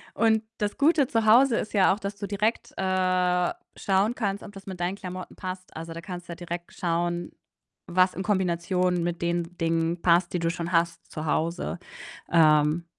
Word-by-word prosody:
Und 220 -1 +3 0.2
das 210 0 -2
Gute 285 -2 +4
zu 225 -2 0
Hause 235 +3 +6
ist 215 - -4
ja 190 -2 +5
auch, 205 - -5
dass 200 0 -4
du 200 - -5
direkt, 210 +3 -1
äh, 185 -1 +1 0.2
schauen 200 +5 +1
kannst, 200 -3 -2
ob - - -9
das 195 -1 -11
mit 190 -2 -7
deinen 180 +2 -1
Klamotten 185 -1 -7
passt. 185 -1 -7
Also, 165 +1 -6
da 165 - -7
kannst 175 +1 -8
du - - -7
ja - - -5
direkt 175 0 -6
schauen, 175 -1 -1 0.6
was 185 +1 +3
in 190 - -4
Kombination 180 -2 +1
mit 175 -1 -3
den 170 0 -2
Dingen 165 0 0
passt, 170 0 +3
die 180 - 0
du 165 0 0
schon 170 +1 -4
hast 170 -1 0
zu 155 - -5
Hause. 165 +3 -1 0.5
Ähm, 155 0 +4
180 Hz, 190 wpm, -26 LUFS, 170-195 Hz, 0.6 s, Hause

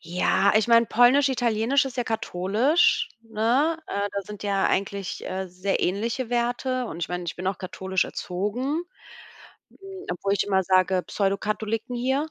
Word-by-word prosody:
Ja, 180 +3 +2
ich 220 +2 +2
meine, 230 0 +6
polnisch, 250 +6 +5
italienisch 245 +1 +1
ist 265 -1 -6
ja 245 - +1
katholisch, 225 - +1
ne? 230 +8 +1
Äh, 200 0 -1
da 200 - -2
sind 210 +1 -9
ja 200 -1 +1
eigentlich, 195 -1 -2
äh, 190 0 -3
sehr 185 +2 -2
ähnliche 230 +6 -1
Werte 245 +1 -1
und 165 - -7
ich - - -2
meine, 180 0 -4
ich 170 - -4
bin 185 +1 -5
auch 190 - -3
katholisch 190 0 -2
erzogen. 235 - -3 0.9
Hm, - - -23 0.3
obwohl 195 +3 -1
ich 200 - +1
immer 190 -2 +2
sage 185 0 +3
Pseudo-Katholiken 215 +4 -2
hier. 265 +5 0
215 Hz, 160 wpm, -25 LUFS, 190-245 Hz, 0.9 s, meine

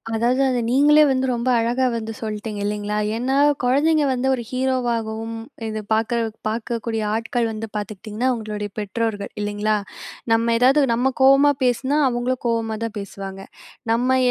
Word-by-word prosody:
அதாவது, 240 +4 +2
அத 250 -1 0
நீங்களே 290 +4 +5
வந்து 260 0 +1
ரொம்ப 240 +1 -1
அழகா 245 +3 +1
வந்து 225 -1 -4
சொல்ட்டீங்க, 215 -1 -5
இல்லைங்களா? 210 0 -2 0.2
ஏன்னா, 260 +4 0 0.3
குழந்தைங்க 295 +5 +3
வந்து 255 +1 -1
ஒரு 240 - -6
ஹீரோவாகவும் 235 -4 -1 0.3
இது 215 0 -3
பார்க்க 225 +2 +1 0.3
பார்க்கக்கூடிய 225 0 -3
ஆட்கள் 230 +1 -1
வந்து 220 0 -5
பார்த்துகிட்டீங்கன்னா, 210 +3 -3
அவங்களுடைய 210 -3 -4
பெற்றோர்கள், 210 0 -3
இல்லைங்களா? 210 +1 0 0.6
நம்ம 230 +1 +3
ஏதாவது 265 +5 +4
நம்ம 250 +3 +1
கோவமா 275 +2 +6
பேசினா, 260 +4 +1
அவங்களும் 245 +1 -2
கோவமா 225 -2 0
தான் 225 -1 -4
பேசுவாங்க. 195 -1 -7 0.5
நம்ம 250 +3 +2
230 Hz, 140 wpm, -22 LUFS, 215-255 Hz, 0.6 s, கோவமா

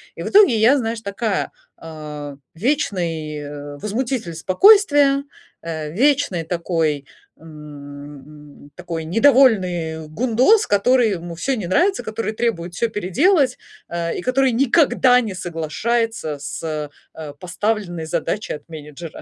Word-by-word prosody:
И - - -6
в - - -4
итоге 390 - +6
я, 235 +6 +5
знаешь, 225 -2 -3
такая, 200 0 -2 0.3
а, 150 -3 -8 0.2
вечный, 170 - -2
э, 145 0 -8
возмутитель 220 - -3
спокойствия, 285 - +4 0.4
э, 155 -2 -5
вечный 255 - +1
такой, 160 -4 -1 0.3
м, 145 -1 -12
такой 170 -2 -5
недовольный 185 - +3
гундос, 250 - +3
который 230 +2 +3
ему 170 -2 -5
всё 260 +11 -1
не 190 -6 -4
нравится, 365 - +2
который 220 0 -3
требует 180 -7 -2
всё 235 - 0
переделать, 255 - +2 0.3
а, 170 -1 -3
и - - -4
который 260 +2 +2
никогда 260 0 +4
не 215 -5 -4
соглашается 175 +2 -2
с, 150 0 -5 0.2
а, 150 -3 -8
поставленной 180 0 -3
задачей 170 +5 -3
от 150 +2 -10
менеджера. 155 +1 -9
180 Hz, 120 wpm, -20 LUFS, 155-240 Hz, 0.4 s, итоге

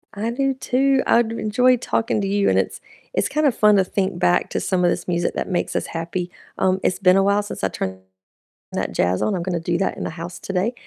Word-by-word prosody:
I 215 +3 -2
do 270 +2 0
too. 265 +1 +1
I 235 - +5
d 230 +1 -5
enjoyed 250 +3 +3
talking 225 -3 0
to 195 - -1
you, 200 0 +2
and - - +3
it's - - -2 0.3
it's - - +1
kind 305 0 +1
of 255 - +1
fun 210 -1 +5
to 190 - +4
think 190 +1 -2
back 90 0 +2
to - - -1
some 185 -2 0
of 175 - +4
this - - -4
music 175 -1 0
that - - -3
makes 180 - -1
us - - -1
happy. 170 +2 -4 0.3
Um, 190 0 +2
it's 185 - 0
been 185 -1 +5
a 195 - +4
while 200 +1 +3
since 205 - -7
I 95 - +2
turned 95 +1 -4 0.7
that - - -3
jazz 90 +1 +1
on. 210 - +1
I'm 175 - -3
gonna 175 -1 -2
do 170 +1 -1
that 195 - -1
in - - -4
the - - -3
house 170 +2 -7
today, 195 +5 -1
195 Hz, 255 wpm, -21 LUFS, 175-225 Hz, 0.7 s, I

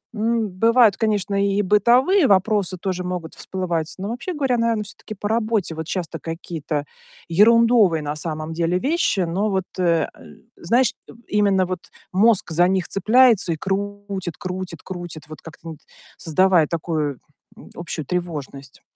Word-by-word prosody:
М, 225 +1 0
бывает, 225 +2 +4
конечно, 205 -2 0
и 200 +1 +1
бытовые 245 - +4
вопросы 195 -1 +2
тоже 185 0 -3
могут 180 -3 -5
всплывать, 170 -4 -3
но, 195 - -4
вообще 245 +10 -4
говоря, 270 -6 0
наверное, 230 -2 +1
всё-таки 215 - -9
по 205 - -4
работе. 220 -6 0
Вот 160 0 -6
часто 170 -2 -4
какие-то 160 -3 -4 0.4
ерундовые 215 -2 +5
на 145 +1 -3
самом 155 0 -4
деле 170 +2 0
вещи, 290 - +1
но 185 +5 0
вот, 190 -2 -1
э 170 -2 +2
э, - - -19 0.4
знаешь 250 - +2
тоб 235 - -14
именно 200 -3 +2
вот 185 -2 -3 0.3
мозг 200 -3 +3
за 175 +3 +3
них 190 -2 0
цепляется 220 -2 +4
и - - -5
крутит 195 -2 -4
крутит 185 -3 -6
крутит, 175 -5 -7
вот 155 - -10
как-то, 165 - -12
ну - - -5
вот, 150 - -15 0.4
создавая 175 0 +3
такую, 155 -4 -2 0.4
м, - - -14
общую 170 -3 -5
тревожность. 145 -5 -5
190 Hz, 155 wpm, -22 LUFS, 165-215 Hz, 0.4 s, ерундовые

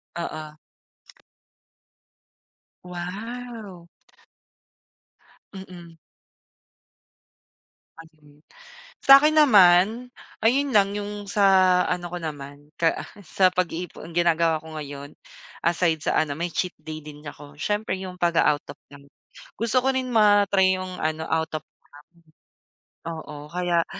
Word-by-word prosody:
Oo. 155 -2 -6 2.3
Wow. 195 +2 -8 1.7
Mm. 175 -3 -11 2.0
Ayun. 155 -2 -18 0.6
Sa'kin 275 +3 +7
naman, 225 - +5 0.3
ayun 275 +5 +3
lang 200 -2 +3
yung 205 0 -5
sa 190 -3 +4
ano 175 -1 -3
ko - - -2
naman 145 -2 -8
ka 165 -1 +2
ah - - -11 0.2
sa 185 +3 +3
pag-iipon, 180 -1 -4
ang - - -14
ginagawa 165 -2 +2
ko 160 0 -10
ngayon, 145 -1 -8 0.5
aside 170 -1 +2
sa - - 0
ano, 145 -2 -3
may 170 +2 -2
cheat 180 - -2
day 155 0 -8
din 150 0 -12
ako 145 0 -11
siyempre 205 +5 -2
yung 185 -1 -8
pag-a-out 165 -3 +2
of - - -36
town. 140 0 -16 0.5
Gusto 230 +3 +1
ko 265 - +1
rin 260 -1 -2
ma-try 200 -3 +4
yung 185 0 -6
ano 155 0 -2
out 160 0 -1
of - - -11
town. - - -75 1.3
Oo 150 -3 -8
kaya 175 -1 0
175 Hz, 115 wpm, -24 LUFS, 155-205 Hz, 2.3 s, Sa'kin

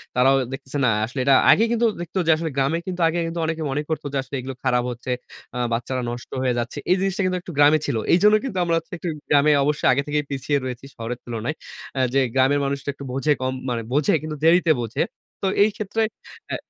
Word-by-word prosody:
তারাও 130 +2 +5 0.2
দেখতেছে 135 +1 -6
না, - - +4 0.2
আসলে 125 +4 -6
এটা 135 -1 +6 0.2
আগে 220 - +5
কিন্তু 235 0 +2 0.2
দেখত 175 +1 -8
যে - - +6 0.3
গ্রামে 140 +4 +2
কিন্তু 180 -1 -3
আগে 165 +1 0
কিন্তু 165 +1 -4
অনেকে 160 0 -2
মনে 140 +2 0
করতো 155 -2 -3
যে - - 0
আসলে 135 +2 -7
এগুলো 130 +1 -6
খারাপ 125 -2 +2
হচ্ছে। 125 +1 -6 0.4
আ - - -3 0.2
বাচ্চারা 125 +2 -2
নষ্ট 120 0 -8
হয়ে 130 -1 +1
যাচ্ছে। 120 +1 -4
এই - - +6
জিনিসটা 195 0 0
কিন্তু 185 0 0
একটু 175 - -9
গ্রামে 145 +2 +6
ছিল। 140 - -1 0.2
এইজন্য 210 +5 +6
কিন্তু 260 -8 -4
আমরা 170 -1 +1
হচ্ছে 165 +3 -6
একটু 175 - -6 0.2
গ্রামে 145 +1 +5
অবশ্যই 150 +1 +1
আগে 130 +2 +2
থেকেই 150 0 0
পিছিয়ে 140 +1 0
রয়েছি 130 +1 -6
শহরের 115 +1 -5
তুলনায়। 120 +5 -3 0.4
আ - - +1
যে 135 - +4
গ্রামের 135 +2 +3
মানুষটা 140 0 -3
একটু 140 0 -10
বোঝে 135 +3 +2
কম। 130 0 -1 0.2
মানে 120 -1 -1
বোঝে 145 0 +3
কিন্তু 155 -1 -5
দেরিতে 165 0 +5
বোঝে। 115 -1 -2 0.4
তো 195 - 0 0.2
এইক্ষেত্রে 215 +1 -1 0.5
এ - - +1
145 Hz, 215 wpm, -23 LUFS, 130-165 Hz, 0.5 s, এটা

